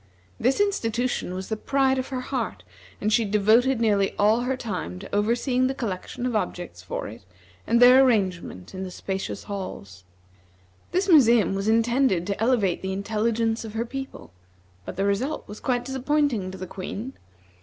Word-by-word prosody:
This 255 - +2
institution 245 - 0
was 190 0 -6
the 220 - 0
pride 265 +3 +1
of 255 - -3
her 260 -2 -4
heart, 245 - -4 0.4
and 215 +1 0
she 230 - +4
devoted 220 +5 +3
nearly 205 -4 +2
all 210 +3 +4
her 255 +1 -1
time 180 - -4
to 90 - -6
overseeing 245 +4 +1
the 265 - -2
collection 230 +1 -4
of 250 -2 -1
objects 175 - -3
for 90 - -5
it, 110 -1 -11 0.4
and 235 - +3
their 250 +2 +8
arrangement 185 - 0
in 190 - -6
the 190 - -4
spacious 190 +2 -5
halls. 100 - -7 0.9
This 375 +2 +1
museum 240 - +5
was 195 +1 -2
intended 230 -4 +2
to 200 +2 -3
elevate 225 -7 +2
the 190 0 -3
intelligence 225 +3 0
of 220 -2 -8
her 230 +1 -1
people, 270 +2 -7 0.5
but - - -6
the 195 - 0
result 200 +9 -1
was 210 - -9
quite 245 -1 -1
disappointing 265 -5 0
to 190 - -8
the 185 - -6
Queen. 200 +7 -6
225 Hz, 170 wpm, -25 LUFS, 195-255 Hz, 0.9 s, their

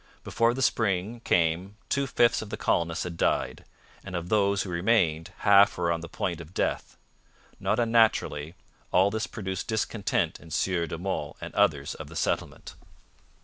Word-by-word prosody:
Before 115 +1 +1
the 135 - -1
spring 110 0 0
came 90 +4 +1
two 140 -1 0
fifths 120 -2 +3
of 110 - -8
the - - -4
colonists 85 -1 0
had 85 -2 -6
died, - - 0 0.4
and 95 -2 -7
of 85 0 -4
those 100 -2 +2
who 95 - -6
remained 85 -3 +1
half 100 0 +6
were 85 -1 +1
on 85 -1 -1
the 85 - -8
point 85 -1 -3
of 85 +3 -13
death. - - -2 0.6
Not 110 - 0
unnaturally, 110 -9 +2 0.4
'all 95 +3 +4
this 110 +1 -2
produced 95 -4 -5
discontent 110 -1 -1
in 85 - -14
Sieur 85 +1 0
de 85 - -5
Monts 85 -5 -4
and - - -8
others 70 0 +1
of - - -9
the - - -12
settlement.' - - -2
95 Hz, 170 wpm, -27 LUFS, 85-110 Hz, 0.6 s, half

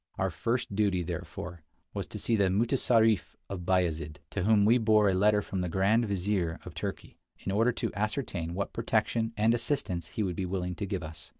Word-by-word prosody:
Our - - 0
first 115 -3 -2
duty, 100 -4 +2
therefore, 85 0 -6 0.3
was - - -4
to - - -7
see 115 - +1
the 100 -2 +3
mutessarif 115 0 +2
of 90 -3 -6
Bayazid, 80 -5 0
to - - -2
whom 105 -1 +5
we 120 +4 +5
bore 110 -2 +4
a 95 - +3
letter 105 +2 +3
from 95 0 -3
the 90 - -2
Grand 105 +6 +2
Vizir 95 -4 0
of - - -8
Turkey, - - -6 0.3
in - - -1
order 115 +5 +3
to - - -3
ascertain 100 -6 -2
what 100 +1 -3
protection 115 0 0
and 110 +2 +4
assistance 115 - -1
he 110 - -2
would 90 -3 -2
be 95 0 -2
willing 90 -1 -2
to 100 +3 -4
give 95 -3 -3
us. 75 -1 -8
100 Hz, 200 wpm, -29 LUFS, 90-110 Hz, 0.3 s, whom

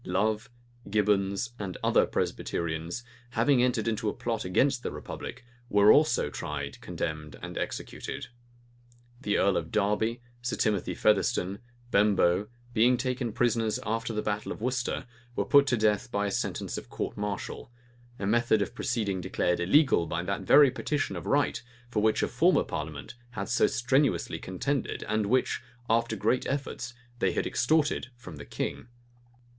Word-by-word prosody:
Love, 105 +6 0 0.4
Gibbons, 100 +1 +1
and 95 -3 -4
other - - +4
Presbyterians, 85 +6 -2 0.3
having 125 +2 +3
entered 125 -3 +1
into 110 -1 0
a - - -3
plot 115 -2 -2
against 130 +8 +2
the - - -3
republic, 125 - -7 0.2
were 105 +1 +6
also 150 - +4
tried, 75 -1 -5
condemned, 75 -2 -4
and - - -6
executed. - - -4 1.0
The 105 -4 +1
earl 95 -1 +3
of 80 -1 -4
Derby, 105 +3 +1 0.2
Sir 125 +1 -2
Timothy 105 -5 0
Featherstone, 95 +3 +2 0.3
Bemboe, 100 -1 +3 0.3
being 120 +2 +4
taken 125 -1 -2
prisoners 115 -1 +1
after 115 +1 -1
the 105 -1 -2
battle 105 0 -2
of - - -5
Worcester, 125 +2 -1 0.3
were - - 0
put 140 -1 +6
to 120 - +2
death 105 -1 +1
by 100 0 0
sentence - - -2
of - - -12
a - - -28
court - - -4
martial; 105 +3 -4 0.5
a 100 - -4
method 110 0 +3
of 100 - -7
proceeding 100 -6 -1
declared 90 -1 0
illegal 95 - +4
by 85 +1 -2
that 100 +2 -2
very 140 +8 +7
petition 145 +2 -2
of - - -6
right, 145 -1 +2 0.3
for 105 - +1
which 110 0 +2
a - - +2
former - - +3
parliament 75 -1 -5 0.2
had - - -3
so 120 - +4
strenuously 130 +3 +1
contended, 125 +9 -2
and 110 -1 0
which, 130 +4 +1 0.3
after 115 +1 +2
great 125 - +1
efforts, 130 -3 -3 0.2
they - - +2
had - - 0
extorted 150 +3 +1
from 90 -11 -10
the 70 - -9
king. - - -4
110 Hz, 155 wpm, -28 LUFS, 100-125 Hz, 1.0 s, very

